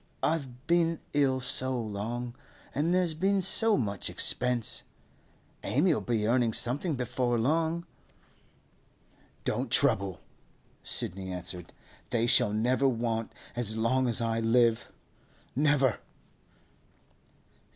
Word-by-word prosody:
'I've 135 Hz, -5 st, -2 dB
been 165 Hz, -1 st, +2 dB, 0.2 s
ill 135 Hz, -3 st, +2 dB
so 130 Hz, 0 st, -1 dB
long, 115 Hz, +3 st, -4 dB, 0.4 s
and 155 Hz, +4 st, 0 dB
there's 180 Hz, -2 st, +1 dB
been 195 Hz, +5 st, +1 dB
so 220 Hz, +4 st, +3 dB
much 100 Hz, -6 st, -1 dB
expense. 125 Hz, -3 st, 0 dB, 0.8 s
Amy'll 155 Hz, +3 st, +2 dB
be 115 Hz, -3 st, -1 dB
earning 120 Hz, 0 st, +2 dB
something 145 Hz, -, +2 dB
before 125 Hz, -1 st, -1 dB
long.' 160 Hz, +7 st, 0 dB, 1.6 s
'Don't -, -, -2 dB
trouble,' 95 Hz, -2 st, +2 dB, 0.6 s
Sidney 95 Hz, +1 st, -1 dB
answered. 90 Hz, -1 st, -6 dB, 0.4 s
'They 120 Hz, -1 st, +1 dB
shall 110 Hz, -3 st, +5 dB
never 125 Hz, +6 st, +2 dB
want 115 Hz, -2 st, -1 dB, 0.2 s
as 110 Hz, -2 st, -2 dB
long 130 Hz, +3 st, +1 dB
as 115 Hz, -1 st, 0 dB
I 115 Hz, 0 st, 0 dB
live—never! 125 Hz, +3 st, 0 dB
125 Hz, 100 wpm, -29 LUFS, 115-145 Hz, 1.6 s, shall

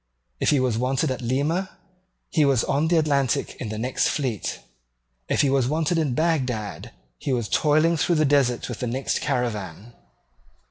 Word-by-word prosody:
If -, -, +2 dB
he 145 Hz, -, +3 dB
was 125 Hz, -3 st, 0 dB
wanted 130 Hz, +4 st, 0 dB
at 130 Hz, -, -4 dB
Lima, 145 Hz, +10 st, -1 dB, 0.5 s
he 155 Hz, -, +3 dB
was 135 Hz, -4 st, +3 dB
on 145 Hz, +3 st, +1 dB
the 170 Hz, +1 st, +3 dB
Atlantic 140 Hz, -5 st, +1 dB
in 115 Hz, -, -4 dB
the 110 Hz, -, -4 dB
next 125 Hz, +4 st, 0 dB
fleet. 130 Hz, -8 st, -2 dB, 0.7 s
If -, -, +2 dB
he 140 Hz, -, +2 dB
was 135 Hz, -3 st, +2 dB
wanted 160 Hz, +3 st, 0 dB
at 145 Hz, -6 st, 0 dB
Bagdad, 130 Hz, -10 st, -1 dB, 0.3 s
he -, -, -3 dB
was 120 Hz, -4 st, 0 dB
toiling 155 Hz, +6 st, +3 dB
through 170 Hz, +3 st, +1 dB
the 155 Hz, -1 st, +3 dB
desert 135 Hz, -4 st, +2 dB
with 120 Hz, -, -6 dB
the 125 Hz, -, -2 dB
next 130 Hz, +3 st, -1 dB
caravan. 105 Hz, -3 st, -3 dB
135 Hz, 175 wpm, -24 LUFS, 120-155 Hz, 0.7 s, he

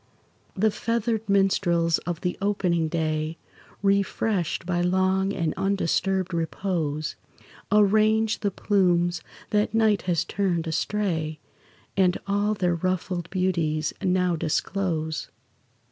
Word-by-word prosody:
The 215 Hz, +3 st, +2 dB
feathered 225 Hz, 0 st, -1 dB
minstrels 175 Hz, -4 st, +2 dB
of 175 Hz, -2 st, -3 dB
the 180 Hz, -, -1 dB
opening 180 Hz, -5 st, +1 dB
day, 155 Hz, 0 st, -1 dB, 0.5 s
Refreshed 200 Hz, -2 st, 0 dB
by 175 Hz, -1 st, 0 dB
long 190 Hz, +2 st, +2 dB
and 165 Hz, -5 st, -1 dB
undisturbed 190 Hz, -1 st, 0 dB
repose, 165 Hz, -3 st, -2 dB, 0.6 s
Arrange 215 Hz, +1 st, +3 dB
the 205 Hz, -, 0 dB
plumes 175 Hz, -3 st, +1 dB, 0.3 s
that 210 Hz, +1 st, +1 dB
night 220 Hz, -3 st, +3 dB
has 170 Hz, -3 st, +1 dB
turned 180 Hz, -4 st, -1 dB
astray, 160 Hz, -2 st, -1 dB, 0.6 s
And 185 Hz, -2 st, +3 dB
all 205 Hz, +2 st, +1 dB
their 180 Hz, -3 st, +1 dB
ruffled 180 Hz, 0 st, -2 dB
beauties 170 Hz, -5 st, 0 dB
now 180 Hz, -2 st, +2 dB
disclose. 160 Hz, 0 st, -2 dB
185 Hz, 105 wpm, -25 LUFS, 170-200 Hz, 0.6 s, Arrange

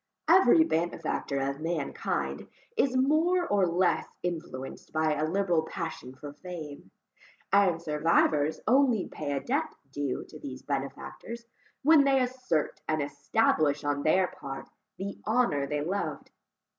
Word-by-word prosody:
Every 335 Hz, -1 st, +7 dB
benefactor 165 Hz, -, -1 dB
of 140 Hz, +1 st, -2 dB
mankind 160 Hz, -3 st, -2 dB, 0.3 s
is 265 Hz, -, +2 dB
more 320 Hz, +7 st, +3 dB
or 200 Hz, -3 st, +3 dB
less 175 Hz, +2 st, +1 dB, 0.2 s
influenced 160 Hz, -7 st, -5 dB
by 155 Hz, 0 st, +1 dB
a 155 Hz, +1 st, 0 dB
liberal 180 Hz, -2 st, +2 dB
passion 160 Hz, -6 st, -6 dB
for 145 Hz, +2 st, -9 dB
fame; 155 Hz, -, -8 dB, 0.6 s
and 195 Hz, -4 st, +4 dB
survivors 155 Hz, -1 st, +2 dB
only 250 Hz, -4 st, +4 dB
pay 145 Hz, -2 st, -4 dB
a 140 Hz, -, -1 dB
debt 300 Hz, +5 st, -1 dB, 0.2 s
due 140 Hz, -2 st, -2 dB
to 155 Hz, -, -11 dB
these 135 Hz, -3 st, -8 dB
benefactors, 145 Hz, -, -5 dB, 0.4 s
when 305 Hz, 0 st, +7 dB
they 275 Hz, -1 st, +4 dB
assert 250 Hz, -, -1 dB
and 155 Hz, 0 st, +1 dB
establish 145 Hz, 0 st, +1 dB
on 145 Hz, -1 st, 0 dB
their 185 Hz, +5 st, +4 dB
part, 135 Hz, -1 st, -6 dB, 0.3 s
the 195 Hz, +1 st, -5 dB
honour 215 Hz, -, +2 dB
they 150 Hz, +1 st, -1 dB
loved. 195 Hz, +5 st, -3 dB
165 Hz, 130 wpm, -29 LUFS, 145-230 Hz, 0.6 s, Every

